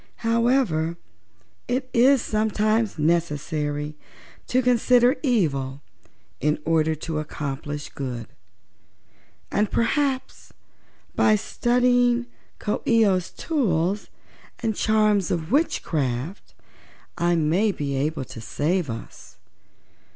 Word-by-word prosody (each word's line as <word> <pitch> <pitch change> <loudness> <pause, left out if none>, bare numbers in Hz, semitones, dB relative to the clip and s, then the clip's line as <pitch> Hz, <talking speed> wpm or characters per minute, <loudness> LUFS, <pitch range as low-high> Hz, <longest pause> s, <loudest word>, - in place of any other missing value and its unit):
However, 230 -9 +2 0.7
it 255 +1 -1
is 255 +1 +5
sometimes 215 0 0
necessary 150 -2 -1 0.5
to 255 +1 +2
consider 250 +2 +4
evil 145 - 0 0.6
in 150 +1 +1
order 160 -1 +2
to 155 +1 -4
accomplish 145 -1 -5
good, 125 -4 -5 1.3
and 210 0 +1
perhaps 265 +2 -1 0.6
by 215 - +4
studying 245 +2 +2 0.3
Coo 210 - -2
ee 230 -2 +5
oh's 185 -3 +1
tools 200 - -1 0.6
and 220 -2 0
charms 215 -4 +2
of 165 +1 -2
witchcraft 155 - -1 0.6
I 175 0 +1
may 170 +7 +2
be 145 -6 -3
able 145 +1 -1
to 115 - -10
save 150 - -1
us. 115 0 -9
185 Hz, 95 wpm, -24 LUFS, 150-235 Hz, 1.3 s, is